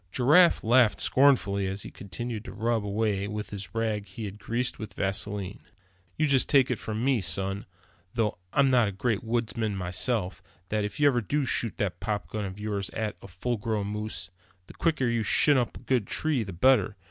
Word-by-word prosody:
Giraffe 150 - +5
laughed 120 -1 +4
scornfully 110 -8 +3
as 95 +1 -4
he - - -8
continued 110 +2 -6
to 120 - -7
rub 115 0 0
away 100 -1 0
with 105 0 -5
a 100 -2 -5
rag 110 -2 -1
he 100 +4 -7
had 100 +1 -7
greased 120 +4 -2
with 110 -3 -7
vaseline. 100 0 -2 0.6
"You 155 - +3
just 135 -3 +2
take 135 -3 +5
it 125 - -1
from 110 +2 -3
me, 135 -5 +3
son, 95 +2 -2 0.5
though 110 -6 0
I'm 135 -1 +4
not 120 -4 +4
a - - -2
great 110 +2 -1
woodsman 115 -2 -1
myself, 95 +2 -1 0.3
that 105 -1 0
if 105 +7 -5
you 145 - +4
ever 130 -4 +4
do 145 +6 0
shoot 115 -3 -1
that 100 -4 -2
popgun 105 0 -3
of 95 +1 -7
yours 105 -2 -2
at 110 -1 -2
a - - -10
full 105 +7 -3
grown 105 -1 -2
moose, 105 -4 -5 0.3
the - - -13
quicker 155 -6 +1
you 120 -1 +1
shin 145 +7 +3
up 120 - -2
a - - -13
good 125 -6 0
tree, 155 -5 0
the 100 - -7
better. 105 +2 +3
110 Hz, 195 wpm, -28 LUFS, 100-125 Hz, 0.6 s, Giraffe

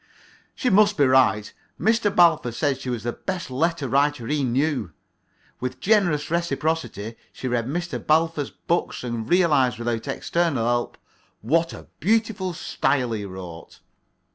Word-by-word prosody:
She 250 - 0
must 205 0 +4
be 145 - +5
right. 130 -5 +3 0.3
Mr. 220 -1 +2
Balfour 165 -9 +4
said 135 +1 -1
she 130 - -5
was 120 -3 -3
the 120 - -1
best 185 -7 -5
letter 160 +2 0
writer 140 -1 +1
he 145 +2 0
knew. 130 - 0 0.7
With 130 0 -4
generous 175 -9 +2
reciprocity 160 - -2
she 130 - -6
read 120 -1 -1
Mr. 175 +5 -3
Balfour's 155 -2 +1
books 170 -5 -2
and 115 -2 -4
realized 150 -10 +3
without 120 +1 -3
external 140 -2 0
help 120 0 -1 0.4
"what 165 +8 +1
a - - -10
beautiful 210 -3 0
style 130 -6 0
he 105 -2 -3
wrote." 90 -4 -9
145 Hz, 140 wpm, -24 LUFS, 120-170 Hz, 0.7 s, be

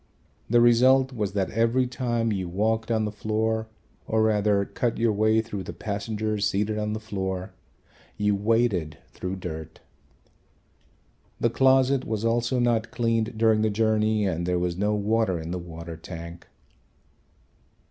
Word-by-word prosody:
The 120 +1 +5
result 130 +3 +5
was 105 -5 -2
that 95 -2 -1
every 115 +4 +2
time 120 -2 -1
you 95 -4 -2
walked 110 +5 0
on 110 -2 +1
the 105 - -3
floor 110 +1 -1 0.4
or 110 0 +2
rather 105 -2 +2
cut 120 +2 -2
your 115 -1 +2
way 110 +2 +3
through 105 -3 -6
the 85 - -7
passengers 105 +2 -2
seated 105 +1 -1
on 105 0 -2
the 110 - -3
floor, 95 -3 -4 0.6
you 105 0 +2
waded 105 -6 +1
through 90 +1 -5
dirt. 80 -4 -7 1.6
The 115 - +1
closet 130 +1 +3
was 110 -2 -3
also 120 +2 +1
not 120 -2 +1
cleaned 115 -2 -1
during 110 -1 +3
the 110 - +2
journey 110 0 +1
and 85 -2 -1
there 90 0 +1
was 90 -1 -1
no 105 +3 0
water 105 -3 +1
in 80 +1 -6
the 90 - -3
water 85 -1 -8
tank. 85 0 -9
110 Hz, 150 wpm, -25 LUFS, 95-115 Hz, 1.6 s, The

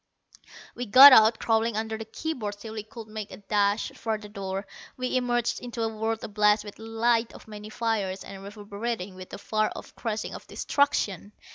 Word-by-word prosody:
We 245 0 -5
got 265 +6 +11
out, 220 -1 +7
crawling 225 -1 +1
under 220 0 -2
the 220 0 -6
key 310 +9 -4
boards 210 -7 -5
till 220 +1 -9
we 220 - -4
could 220 +1 -11
make 215 -1 -6
a - - -10
dash 205 +1 0
for 220 -1 -3
the 210 -1 -11
door. 195 -1 -5 0.3
We 255 0 -2
emerged 240 -2 0
into 240 -2 -5
a 225 -1 -2
world 225 +1 -2
ablaze 210 0 +2
with 205 -1 -10
the 220 - -10
light 230 +1 +1
of - - -14
many 210 0 -9
fires, 215 -4 -2
and 195 -1 -10
reverberating 205 0 -5
with 185 0 -11
the - - -7
far 215 +1 0
off - - -10
crashing 220 -2 -4
of - - -10
destruction. 210 - 0
220 Hz, 200 wpm, -27 LUFS, 205-230 Hz, 0.3 s, got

